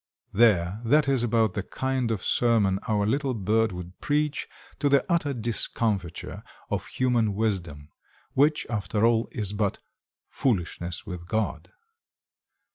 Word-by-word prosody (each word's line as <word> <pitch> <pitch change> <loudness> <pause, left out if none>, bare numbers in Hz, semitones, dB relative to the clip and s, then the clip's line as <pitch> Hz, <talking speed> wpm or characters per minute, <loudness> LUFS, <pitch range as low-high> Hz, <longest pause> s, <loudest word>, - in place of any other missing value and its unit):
There, 100 -3 +3
that 145 +5 +3
is 135 -3 +2
about 115 -4 +2
the 105 - -2
kind 130 +3 -2
of 110 -5 -2
sermon 105 -5 +2
our 105 -2 +1
little 135 +3 0
bird 110 +2 +1
would 90 0 -8
preach 150 0 0 0.3
to 145 - +2
the 140 0 +4
utter 170 -5 +1
discomfiture 110 - -1 0.3
of - - -2
human 120 -5 +1
wisdom, 85 -9 -2 0.4
which, 150 +3 +3
after 105 -1 0
all, 115 -1 +2
is 105 -4 +2
but 100 -2 0 0.5
"foolishness 90 - -2
with 90 -3 -7
God." 110 +3 -2
110 Hz, 130 wpm, -26 LUFS, 95-125 Hz, 0.5 s, the